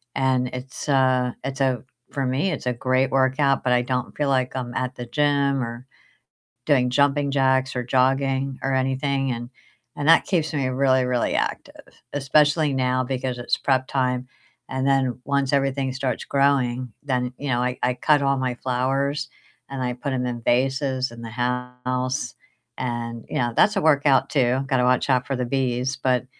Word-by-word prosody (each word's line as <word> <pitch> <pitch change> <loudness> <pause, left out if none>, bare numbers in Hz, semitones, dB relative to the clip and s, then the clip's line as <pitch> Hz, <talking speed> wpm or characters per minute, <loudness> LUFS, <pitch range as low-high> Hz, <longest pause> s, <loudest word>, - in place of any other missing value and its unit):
and 130 -1 +1
it's, 130 +3 -7
uh 130 -2 +3
it's 135 +1 -4
a 130 -2 +1 0.3
for 135 -1 -2
me, 135 +9 0
it's 150 - -5
a 125 - +1
great 130 +2 +1
workout, 135 +1 +2
but 125 - +2
I 125 - +3
don't 125 0 -3
feel 145 -2 0
like 130 -1 0
I'm 125 -2 -4
at 130 0 -2
the 120 - -6
gym 140 +1 +1
or 120 +2 -7 0.8
doing 130 -4 +3
jumping 140 +2 +2
jacks 130 -1 +2
or 125 - 0
jogging 135 +1 +1
or 135 0 0
anything 135 0 0
and 120 +1 -6 0.5
and 145 +1 -1
that 165 - +7
keeps 165 -5 0
me 135 -3 0
really, 130 0 +2
really 125 -1 0
active, - - -4 0.2
especially 145 +2 +2
now 130 0 +1
because 130 -1 -3
it's 120 - 0
prep 130 -1 +1
time, 125 -1 -1 0.4
and 130 0 -2
then 135 -3 +1
once 140 -1 0
everything 135 -1 0
starts 130 0 -2
growing, 130 -3 +1
then, 125 -3 -1
you 145 - -5
know, 120 -1 +1
I 125 0 -1
I 125 0 +2
cut 145 +4 +3
all 140 0 +2
my 130 -1 -1
flowers 135 +3 -1 0.4
and 135 -1 -4
I 125 -1 -1
put 135 +3 -4
'em 125 -1 -1
in 120 -1 -4
vases 130 +1 +1
in 115 0 -10
the 115 - -7
house 125 +2 -2 0.4
and, 120 -2 -4
you - - -2
know, 120 -1 0
that's 210 - +5
a - - +3
workout 145 -3 +4
too, 130 -1 +1
gotta 130 -3 +2
watch 125 +2 +2
out 125 -1 +2
for 135 - -2
the 125 0 -2
bees, 130 0 -1
but 130 -2 0
130 Hz, 180 wpm, -23 LUFS, 125-140 Hz, 0.8 s, that